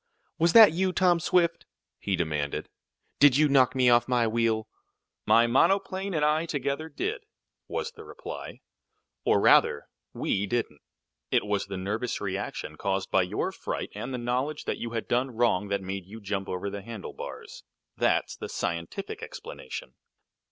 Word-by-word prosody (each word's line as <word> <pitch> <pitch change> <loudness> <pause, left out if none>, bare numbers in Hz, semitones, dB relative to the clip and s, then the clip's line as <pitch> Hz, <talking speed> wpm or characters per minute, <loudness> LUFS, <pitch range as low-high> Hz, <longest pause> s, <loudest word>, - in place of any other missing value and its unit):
"Was 170 +1 +3
that 220 -5 +10
you, 185 +3 +1
Tom 180 -2 +3
Swift?" 170 0 +1 0.3
he 100 - -1
demanded. 75 -4 -2 0.5
"Did 140 -2 +7
you 155 0 +5
knock 135 -2 +4
me 130 -1 +3
off 120 -1 +5
my 125 -2 +2
wheel?" 110 -1 0 0.6
"My 115 +2 +6
monoplane 190 +8 +1
and 150 -1 +2
I 155 +2 +2
together 145 +2 -2
did," 145 - -3 0.5
was - - -3
the - - -12
reply; - - -8 0.6
"or, - - +4
rather, 70 - +4 0.2
we 100 +1 -1
didn't. 95 -9 -2 0.5
It - - +2
was 100 -2 -1
the 100 -1 -5
nervous 105 +6 -2
reaction 100 0 -4
caused 95 -1 -2
by 95 - +4
your 90 - -2
fright, - - -5
and 125 - -5
the 125 - -2
knowledge 125 +5 -2
that - - -2
you 120 - -4
had 115 -1 -4
done 125 0 0
wrong, 110 -4 +2
that 100 -1 -1
made 95 -1 -5
you 110 +3 -9
jump 100 -2 -3
over 95 +2 -3
the 100 0 -5
handlebars. 110 0 -8 0.3
That's - - +1
the - - -7
scientific 85 0 -4
explanation." 65 -1 -8
120 Hz, 160 wpm, -27 LUFS, 100-145 Hz, 0.6 s, that